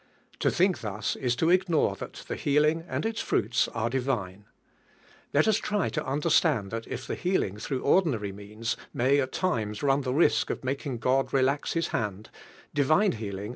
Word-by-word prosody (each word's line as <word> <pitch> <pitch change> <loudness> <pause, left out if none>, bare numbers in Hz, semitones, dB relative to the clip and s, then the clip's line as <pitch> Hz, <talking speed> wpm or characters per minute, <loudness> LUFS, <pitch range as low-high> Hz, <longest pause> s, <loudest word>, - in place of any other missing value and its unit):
To - - +2
think 185 +1 +2
thus 105 0 -2
is 125 -2 -1
to 165 +6 +2
ignore 180 -4 +2
that - - -8
the - - -3
healing 150 +3 +2
and - - -3
iis 225 0 -2
fruits 110 +2 +1
are 115 0 -2
divine. 115 -7 -2 0.9
Let 145 +7 +3
us 220 -1 +4
try 210 -3 -1
to 150 -4 -3
under 150 +4 0
slant! 130 - +3
that 115 0 -5
if 130 - -5
the - - -4
healing 175 - -1
through 130 +4 -3
ordinary 135 - +2
means 105 +4 -4 0.2
may 135 +4 +3
at 130 -1 -1
times 110 - -1
run 140 0 +3
the 130 -2 -2
risk 150 +6 +3
of - - -4
mak 135 +3 -3
ing 130 -3 -3
God 130 +4 +1
relax 135 +2 +1
His 165 -1 0
hand, 105 -1 -3 0.4
divine 155 +8 +3
healing 105 -2 -5
135 Hz, 185 wpm, -27 LUFS, 110-155 Hz, 0.9 s, us